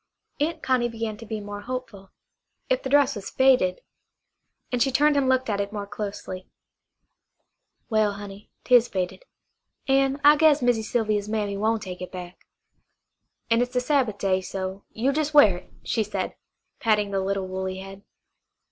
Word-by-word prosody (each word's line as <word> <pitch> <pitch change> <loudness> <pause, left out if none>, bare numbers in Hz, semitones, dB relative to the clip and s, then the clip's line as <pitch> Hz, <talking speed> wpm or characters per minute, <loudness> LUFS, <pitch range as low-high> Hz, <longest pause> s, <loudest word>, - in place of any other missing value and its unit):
Aunt 315 +2 -1
Connie 250 -2 +2
began 225 -2 -4
to 230 - -11
be 220 0 -3
more 205 0 -7
hopeful. 220 -5 -6 0.6
If - - +2
the - - -4
dress 285 0 +4
was 200 -2 -6
faded 255 -9 +3 0.9
and 245 -1 0
she 270 - +3
turned 295 +3 +4
and 275 -2 +2
looked 260 0 +2
at 205 -2 0
it 200 0 -4
more 205 -1 -4
closely. 200 -2 -6 1.4
"Well, 215 -2 +2
honey, 200 0 -10
'tis 245 -2 +5
faded. 190 - -4 0.6
An' 270 +1 +2
I 295 +1 +7
guess 305 -1 +5
Missy 245 -3 +2
Sylvia's 215 -2 -1
mammy 210 -2 -1
won' 220 +2 +1
take 185 -3 -8
it 180 - -6
back. 180 -1 -9 1.0
An' 230 +1 +4
it's 245 +1 -2
the - - +4
Sabbath 250 -5 +1
day, 190 -2 +1
so 190 +1 -5
you 250 +5 0
jes' 305 0 -1
wear 210 -11 +7
it," - - -16
she 225 - 0
said, 210 - -3 0.5
patting 210 -3 +1
the 195 - 0
little 195 0 -1
woolly 190 0 -4
head. 195 +1 -9
215 Hz, 165 wpm, -25 LUFS, 200-260 Hz, 1.4 s, I